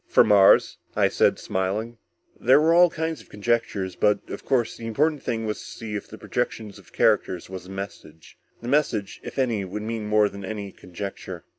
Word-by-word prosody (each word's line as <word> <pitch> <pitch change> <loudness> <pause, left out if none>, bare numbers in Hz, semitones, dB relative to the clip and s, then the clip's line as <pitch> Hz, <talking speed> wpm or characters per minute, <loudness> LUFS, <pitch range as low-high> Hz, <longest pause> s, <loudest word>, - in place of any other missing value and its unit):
"From - - +4
Mars?" 100 -2 +5 0.2
I - - +3
said, - - +2
smiling. 105 +5 -3 0.4
"There 130 +4 +5
were 160 +2 +4
all 175 +1 +7
kinds 160 -1 -3
of - - -20
conjectures, 105 -4 -1
but, 105 +2 +1
of - - -6
course, 120 -4 0
the 115 - -7
important 150 +5 +1
thing 115 -2 -2
was 105 -1 -3
to - - -9
see 110 -2 -7
if 105 - -4
the 110 - -11
projection 115 -3 -3
of 100 - -16
characters 90 0 +1
was 95 -1 -7
a - - -12
message. 95 -5 -9 0.3
The - - -5
message, 120 -8 0
if - - -8
any, 120 -6 +1
would 100 +3 -5
mean 110 -1 -4
more 105 0 +4
than 100 -1 -9
any 100 0 -5
conjecture." 90 -1 -8
105 Hz, 195 wpm, -24 LUFS, 100-120 Hz, 0.4 s, all